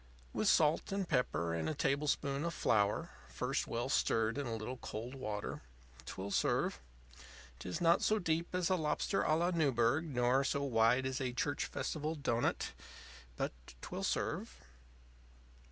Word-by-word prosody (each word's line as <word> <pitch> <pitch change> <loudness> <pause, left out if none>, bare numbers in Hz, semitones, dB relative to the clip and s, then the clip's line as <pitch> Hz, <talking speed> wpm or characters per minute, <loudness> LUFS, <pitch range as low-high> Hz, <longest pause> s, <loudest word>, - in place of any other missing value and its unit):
With - - 0
salt 155 +3 +4
and 195 -2 -1
pepper 125 - 0
and 85 - -1
a 155 - -2
tablespoonful 140 +1 0
of 170 - -4
flour 105 -2 +2 0.2
(first - - -1
well - - -2
stirred 115 0 +2
in 140 - -2
a 115 - -2
little 115 +4 -5
cold 115 +1 -6
water) 105 -6 -4 0.5
'twill 100 +1 -5
serve - - +1 0.8
'tis 90 +7 -4
not 170 0 +4
so 215 - +3
deep 170 -1 -1
as 180 0 +1
a - - +5
lobster 155 -4 0
├Ā 155 - +3
la 175 +2 +2
Newburg 140 -2 +2
nor 130 -2 +2
so 140 0 0
wide 120 0 +3
as 130 0 -2
a 125 -2 -1
church 145 +3 -1
festival 155 +1 -3
doughnut; 120 -5 0 0.6
but - - -1 0.3
'twill - - -5
serve. - - -1
135 Hz, 155 wpm, -35 LUFS, 115-160 Hz, 0.8 s, a